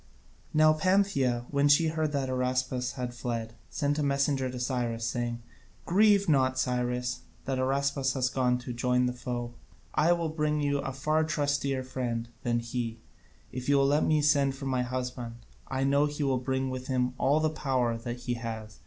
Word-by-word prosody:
Now 155 0 +5
Pantheia, 155 -9 +2
when 140 0 +3
she 150 +3 +5
heard 155 -1 -1
that 140 -2 -1
Araspas 130 0 -1
had 125 -2 -4
fled, 115 -2 -4 0.2
sent 145 +1 -1
a - - +1
messenger 140 -1 +1
to 125 0 -6
Cyrus, 120 -2 -1
saying: 120 0 -2 0.4
"Grieve 200 +2 +4
not, 130 -4 +3
Cyrus, 125 -1 -1 0.3
that 135 -1 -1
Araspas 135 0 +1
has 130 -1 +1
gone 125 -1 +1
to 125 0 -6
join 125 +1 +1
the 125 - 0
foe: 120 -1 -4 0.4
I 155 +3 +3
will 170 -2 -1
bring 150 -1 0
you 145 -1 +1
a 135 - -3
far 155 +4 +1
trustier 145 -3 0
friend 120 -3 -3
than 120 -1 0
he, 115 -1 -3 0.5
if 125 +1 -5
you 140 - +5
will 135 - +4
let 145 +2 +3
me 155 -1 +2
send 140 -2 +3
for 135 - -7
my 130 -2 +1
husband, 125 -1 -4
and 120 - -18 0.2
I 135 0 -1
know 140 +2 +3
he 145 0 -3
will 135 -2 +1
bring 130 +1 -1
with 130 0 -5
him 125 -1 0
all 145 +3 +3
the 155 0 +1
power 130 -6 0
that 120 +1 -6
he 125 - -2
has. 110 -2 -6
130 Hz, 190 wpm, -29 LUFS, 125-145 Hz, 0.5 s, Now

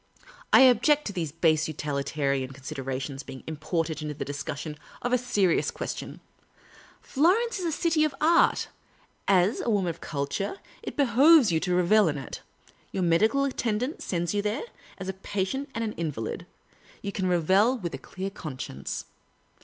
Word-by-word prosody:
" - - -21
I - - +8
object 265 +4 +5
to 205 - -4
these 165 -5 -3
base 160 -1 +2
utilitarian 140 -3 -2
considera 135 -1 -5
tions 135 0 -5
being 135 -1 -10
imported 160 0 -2
into 150 -1 -4
the - - -4
discussion 145 +2 -5 0.2
of 245 +1 0
a - - +6
serious 205 -8 +2
ques - - -4
tion. - - -8 0.8
Florence 390 - +2
is 360 - -3
the 330 - 0
city 320 0 +2
of 305 -2 0
art; 335 +2 +4 0.6
as 190 +2 +3
a - - -2
woman 195 -5 +1
of - - -13
culture, 150 - -3 0.2
it - - -7
behoves 275 - +6
you 160 - +2
to 180 +1 0
revel 180 +3 +4
in 150 -2 -1
it. 135 - -7 0.5
Your 190 - -1
medical 215 +11 +3
attendant 250 +1 -2
sends 175 -1 -2
you 205 - +1
there; 210 +2 -2 0.3
as 190 - -6
a 190 - -2
patient 195 +8 -3
and 230 - -1
an 215 -1 -2
invalid, 150 -10 -4 0.6
you 200 - -3
can 190 -2 -1
revel 190 +8 +3
with 175 -7 -5
a - - -5
clear 190 +1 -6
conscience. 130 - -6
185 Hz, 170 wpm, -27 LUFS, 155-240 Hz, 0.8 s, I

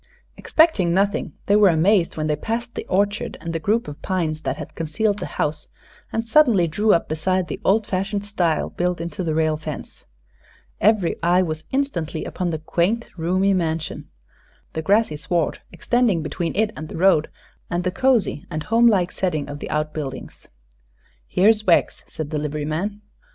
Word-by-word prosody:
Expecting 205 - +3
nothing, 200 +1 0
they 200 - +3
were 210 -2 +6
amazed 170 +2 +2
when 155 - -1
they 150 -1 +1
passed 230 +8 -4
the - - -6
orchard 205 +2 0
and 165 -1 -5
the 165 - -1
group 215 +8 0
of 145 0 -8
pines 160 -5 -1
that - - -2
had - - -8
concealed 200 +6 -1
the - - -4
house 150 0 -1 0.4
and 225 +1 -2
suddenly 230 - +4
drew 210 +7 +2
up 170 - +2
beside 180 +4 0
the - - -6
old 210 +2 +3
fashioned 200 +2 -2
stile 175 -6 0
built 180 -1 -1
into 170 +2 -4
the 160 -2 -1
rail 155 -1 +1
fence. 155 -1 -8 0.7
Every 210 -4 +3
eye 175 +2 +3
was 155 -2 -4
instantly 185 - -2
upon 180 -1 -3
the 160 - -2
quaint, 180 +9 -1
roomy 185 +4 +1
mansion, 165 -3 -2 0.7
the 160 - -2
grassy 200 -2 +2
sward 155 +3 -1
extending 235 -9 +1
between 165 +3 -3
it 215 +1 +1
and 155 0 -7
the - - -7
road, 170 -4 +4 0.4
and 175 0 -1
the 180 - 0
cosy 235 - +1
and 155 -3 -4
home 230 +2 +4
like 185 -5 +3
setting 155 -6 -2
of 145 0 -7
the - - -6
outbuildings. 150 -2 -4 0.8
"Here's 210 - +3
Wegg's," 170 - +3
said 155 -1 -6
the 155 - -1
liveryman. 155 +7 -3
180 Hz, 170 wpm, -22 LUFS, 155-205 Hz, 0.8 s, were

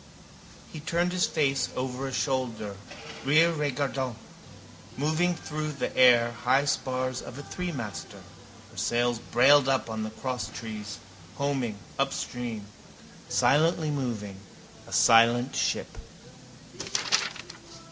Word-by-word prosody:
He 155 - -6
turned 175 +3 0
his 180 -1 +2
face 140 -4 +1
over 130 +1 -3
a - - -5
shoulder, 125 -7 -2 0.5
rere 155 +5 +5
regardant. 135 -4 -2 0.8
Moving 160 +5 +1
through 155 -1 -4
the 140 - -4
air 120 -2 +6
high 130 +3 +3
spars 130 -2 -1
of 125 - -9
a 145 - -7
threemaster, 125 - -6 0.5
her - - -16
sails 120 0 +1
brailed 135 +4 +5
up 130 -4 0
on 110 0 -3
the 110 - -3
crosstrees, 110 -3 -5 0.4
homing, 135 -6 -1 0.2
upstream, 125 -5 -2 0.6
silently 155 +1 +3
moving, 115 -8 -3 0.5
a - - -13
silent 120 +2 +5
ship. - - -1
130 Hz, 105 wpm, -28 LUFS, 120-145 Hz, 0.8 s, air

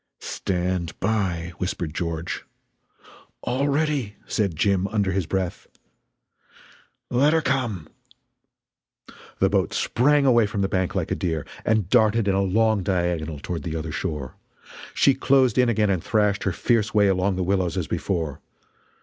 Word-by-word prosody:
"Stand 90 -2 -2
by!" 95 -5 -1
whispered 90 -4 -3
George. 85 0 -3 1.0
"All 130 +4 0
ready!" 140 -7 0
said 100 -6 -1
Jim, 95 +3 +1
under 100 -3 0
his 95 -3 -1
breath. 95 -1 -3 1.4
"Let 140 +5 +3
her 160 - +3
come!" 120 - -1 1.5
The - - +3
boat - - +1
sprang 145 +3 +2
away 120 -5 +5
from 100 -1 -3
the 95 - +2
bank 95 -1 -1
like - - -2
a - - +2
deer, 80 -4 -2 0.2
and 110 -4 +1
darted 110 +2 +3
in 100 - +3
a 95 - +2
long 110 +2 +2
diagonal 85 -5 -1
toward 80 +4 -5
the 80 -2 -4
other 80 -1 -4
shore. 75 -6 -4 0.6
She 140 - +5
closed 130 -1 +3
in 125 -1 +4
again 105 -3 +2
and 90 -4 -1
thrashed 105 -2 +1
her 95 - +2
fierce 110 +2 0
way 105 -1 +5
along 95 0 +1
the 90 - -1
willows 95 -1 0
as - - -1
before. 80 -6 -3
100 Hz, 150 wpm, -24 LUFS, 90-110 Hz, 1.5 s, away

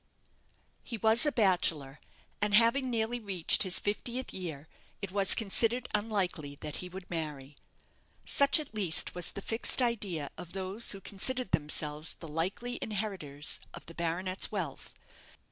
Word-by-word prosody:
He 235 - -5
was 220 +6 +6
a - - +3
bachelor, 170 - +1 0.4
and 210 0 +3
having 235 +4 +4
nearly 235 0 -1
reached 195 -7 +1
his 185 -3 +4
fiftieth 240 +5 -2
year 160 -5 -6 0.3
it 200 -2 -5
was 195 -1 +4
considered 230 +3 +1
unlikely 185 -9 -1
that 150 -1 -5
he 180 - -6
would 185 0 -9
marry. 150 -4 -5 0.7
Such 280 +3 +4
at 295 -6 -7
least 190 -7 0
was 180 -1 -1
the 200 - -7
fixed 225 +3 -2
idea 200 - 0
of 170 - -9
those 195 +4 -1
who 195 - -9
considered 250 +7 -2
themselves 150 0 +1
the 165 - -10
likely 190 +11 -3
inheritors 190 -9 -1 0.2
of - - -10
the 165 - -11
baronet's 175 +3 0
wealth. 180 -10 -5
190 Hz, 145 wpm, -31 LUFS, 165-225 Hz, 0.7 s, was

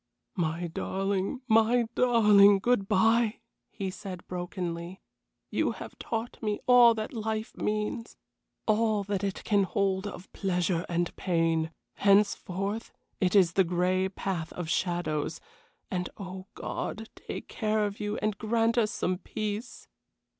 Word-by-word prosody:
"My 170 -1 -1
darling, 195 - -2
my 225 +2 +4
darling! 210 -5 +6
Good 200 -1 +1
bye," 225 +2 +3 0.3
he 195 -3 -4
said, 185 -2 -8
brokenly. 175 0 -4 0.5
"You - - +1
have - - -9
taught 230 +1 -4
me 210 -2 -1
all 245 -2 +7
that 215 +2 -4
life 220 -1 -3
means; 215 +2 -2 0.5
all 215 -1 +2
that 200 -1 -2
it 195 -1 -3
can 205 -2 +3
hold 195 0 0
of 190 -1 -9
pleasure 180 -2 0
and 175 0 -1
pain. 165 -3 +1 0.3
Henceforth, 200 +1 +1 0.3
it 185 0 +1
is 180 -4 +5
the 190 - +4
gray 180 +2 +1
path 185 -4 -3
of 175 -3 -5
shadows; 175 -4 -1 0.5
and 180 -1 -2
oh, 190 -1 -7
God 220 +1 -4
take - - -7
care 215 -1 0
of 205 0 -5
you 210 0 -2
and 215 -1 0
grant 230 +2 +2
us 215 -2 +2
some 185 -3 -1
peace." 215 +3 -5
200 Hz, 135 wpm, -29 LUFS, 180-220 Hz, 0.5 s, all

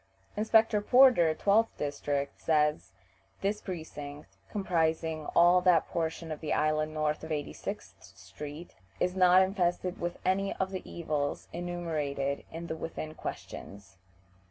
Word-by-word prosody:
Inspector 220 0 +3
Porter, 235 -10 +6
12th 215 +5 +2
district 145 -1 -3
says, 150 -9 +1 0.5
"This 205 +2 -1
precinct, 150 -5 -8
comprising 160 -5 0
all 175 +1 +6
that 180 -3 +4
portion 165 0 -3
of 155 - -4
the 155 - -1
island 155 0 +1
north 155 0 -1
of 160 - -7
86th 150 -2 -6
street, 150 +3 -9 0.3
is 180 +1 0
not 185 0 +6
infested 180 -1 -1
with 175 0 -3
any 195 +1 +1
of 190 0 -2
the 185 -1 -4
evils 150 -4 -3
enumerated 155 -6 -2
in 165 +1 -6
the 160 - -4
within 160 -1 -6
questions." 100 -9 -8
165 Hz, 130 wpm, -30 LUFS, 150-185 Hz, 0.5 s, Porter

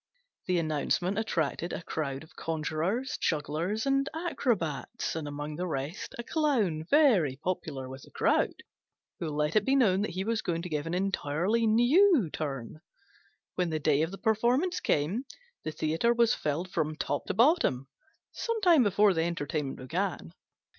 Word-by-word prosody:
The 180 -1 +2
announcement 170 +5 0
attracted 170 -5 -1
a - - -5
crowd 140 -4 -3
of 160 - -18
conjurers, 165 - -2
jugglers, 165 - -1
and 275 0 +1
acrobats, 225 - -2
and 160 -2 -4
among 145 +1 -5
the 180 +1 -2
rest 155 - -4
a 235 - -4
Clown, 230 - +1
very 225 - +4
popular 140 -4 -4
with 130 +1 -9
the - - -15
crowd, - - +1 0.6
who 165 - -3
let 150 +2 -1
it 215 - +4
be 265 +5 +2
known 200 -8 +4
that 210 - -1
he 190 - 0
was 225 +1 -1
going 170 -1 -2
to 180 - -5
give 150 -1 -2
an 170 - -2
entirely 190 +4 0
new 245 - +4
turn. 140 -1 -5 0.7
When 180 -2 0
the 160 - -1
day 150 -1 +2
of 160 - 0
the 195 - -8
performance 245 - +1
came, 180 - 0 0.4
the 155 - -3
theatre 160 +10 +1
was 235 -1 +4
filled 165 +5 -2
from 155 -3 -1
top - - -3
to - - -2
bottom 230 - +3 0.4
some 460 -1 -2
time 345 -7 +6
before 205 -2 +4
the 165 -1 +1
entertainment 150 -4 -3
began. 160 - -3
175 Hz, 165 wpm, -29 LUFS, 155-230 Hz, 0.7 s, time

